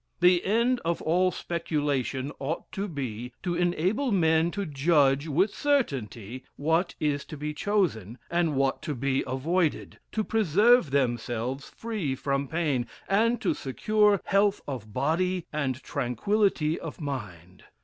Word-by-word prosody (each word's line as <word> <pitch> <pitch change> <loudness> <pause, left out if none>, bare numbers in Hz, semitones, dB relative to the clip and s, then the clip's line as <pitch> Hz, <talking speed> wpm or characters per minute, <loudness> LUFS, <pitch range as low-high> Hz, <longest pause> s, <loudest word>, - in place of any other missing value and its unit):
The 180 0 +5
end 235 +5 +2
of 170 0 0
all 180 +3 +3
speculation 145 -7 -2
ought 145 +5 -4
to 200 +1 -3
be, 125 - -5
to 180 -2 -1
enable 180 - +1
men 160 -3 +3
to 200 +2 -3
judge 145 -1 +2
with 180 +8 +2
certainty 130 - -1
what 165 +5 0
is 145 -2 0
to 155 - -8
be 150 +1 -4
chosen, 150 - -1
and 170 -3 +1
what 135 0 +1
to 150 -3 -3
be 135 +2 0
avoided, 155 +6 -1
to 215 - 0
preserve 215 - +4
themselves 125 0 -1
free 210 -12 -3
from 140 +1 -1
pain, 145 -6 0 0.2
and 230 +5 +2
to - - +1
secure 210 +10 +2
health 200 +1 +2
of 120 -7 -6
body, 175 - 0
and 135 -4 -2
tranquillity 155 - 0
of 165 - -7
mind. 100 - -7
155 Hz, 140 wpm, -27 LUFS, 135-185 Hz, 0.2 s, The